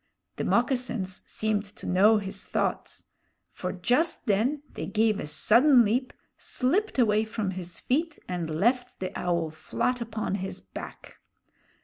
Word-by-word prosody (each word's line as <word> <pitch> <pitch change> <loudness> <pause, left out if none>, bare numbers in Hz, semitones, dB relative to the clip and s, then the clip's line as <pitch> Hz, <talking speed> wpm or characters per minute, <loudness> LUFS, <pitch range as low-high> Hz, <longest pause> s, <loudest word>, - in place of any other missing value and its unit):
The - - -2
moccasins 240 -6 0
seemed 215 -1 0
to 205 - -12
know 205 +5 +5
his 195 -2 -4
thoughts; - - -2 0.5
for 180 - -4
just 250 - 0
then 245 +9 +1
they - - -5
gave 215 -1 +2
a - - -4
sudden 235 - +5
leap, 250 +5 0 0.3
slipped 365 +12 0
away 215 -3 +4
from 215 -3 -3
his 180 -2 -7
feet, 315 +4 0
and 175 -3 -3
left 240 +10 0
the 185 - -4
Owl 170 -3 -1
flat 245 +9 -2
upon 220 -3 -3
his 190 - -4
back! - - -10
220 Hz, 140 wpm, -27 LUFS, 190-250 Hz, 0.5 s, know